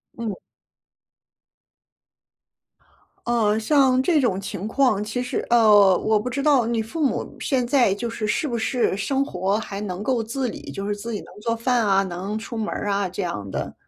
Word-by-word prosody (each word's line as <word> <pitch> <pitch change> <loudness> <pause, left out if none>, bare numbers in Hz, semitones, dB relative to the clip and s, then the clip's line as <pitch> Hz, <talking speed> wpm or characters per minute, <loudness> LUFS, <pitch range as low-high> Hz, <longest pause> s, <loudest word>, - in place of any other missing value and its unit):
嗯。 220 -5 -4 2.9
呃， 220 -2 +2
像 260 +1 +3
这 305 +1 +2
种 195 -6 +1
情 200 0 -5
况， 225 -3 +2
其 215 +4 -3
实 250 - -3
呃， 210 -5 +6
我 215 0 +2
不 225 +4 -2
知 265 +3 -2
道 275 -5 +4
你 230 -1 0
父 300 +8 -4
母 - - -2
现 255 -4 0
在， 245 -7 +3
就 235 +3 -4
是 225 -1 -4
是 215 +8 0
不 240 -4 -2
是 230 -1 0
生 265 +7 0
活 195 -1 -1
还 200 -1 -6
能 185 -2 -4
够 240 +1 0
自 250 +4 -2
理， - - -7
就 195 +1 -5
是 205 - -1
自 230 +3 -6
己 210 - -3
能 - - -12
做 230 +1 0
饭 235 0 +1
啊， 195 -1 +3
能 195 +4 -4
出 230 +1 -8
门 220 -1 -2
儿 205 - -4
啊 200 -2 0
这 190 +2 -4
样 105 - -4
的？ - - -4
220 Hz, 205 characters per minute, -23 LUFS, 200-250 Hz, 2.9 s, 呃